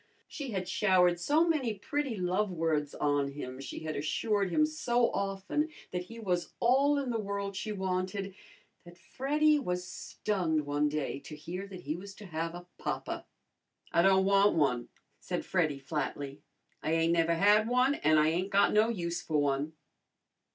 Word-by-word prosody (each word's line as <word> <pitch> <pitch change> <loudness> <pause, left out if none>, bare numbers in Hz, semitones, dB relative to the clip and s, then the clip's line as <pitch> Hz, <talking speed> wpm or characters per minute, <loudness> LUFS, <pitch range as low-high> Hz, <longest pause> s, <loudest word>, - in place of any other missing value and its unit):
She 285 -6 -6
had 190 -4 -3
showered 180 -4 +3
so 305 - +3
many 270 -9 +1
pretty 270 +3 -2
love 185 +3 0
words 160 -4 -1
on 145 -1 0
him, 130 -2 -7
she - - -7
had 155 -1 -4
assured 200 +7 0
him 305 - +3
so 245 -6 +1
often 195 +10 -1 0.2
that 180 0 -3
he 230 +5 -11
was 180 -5 -2
all 275 +4 +4
in 270 -3 -1
the 230 - -1
world 200 -1 -3
she 215 +2 -3
wanted, 190 0 -2 0.5
that 175 0 -14
Freddy 300 +6 +2
was 180 -8 -2
stunned 170 -7 -2
one 145 +1 +1
day 145 -2 -2
to 150 - -9
hear 180 +6 -6
that 190 -2 -9
he 155 -1 -3
was 195 +2 -9
to 210 - -11
have 165 -1 -3
a 175 0 -9
papa. - - -4 0.7
"I 170 - +5
don' 190 +1 +5
wan' 200 -1 +4
one," 125 -6 +1 0.3
said - - -4
Freddy 160 -6 +1
flatly. 140 -1 -4 0.4
"I 155 - 0
ain't 165 +1 +3
never 165 0 +3
had 210 +5 +4
one, 250 +3 +3
an' 155 - +3
I 155 +1 +5
ain't 180 +4 -1
got 200 0 +4
no 215 +2 +4
use 175 -5 -2
for 160 -3 -1
one." 145 +2 0
185 Hz, 175 wpm, -31 LUFS, 160-215 Hz, 0.7 s, I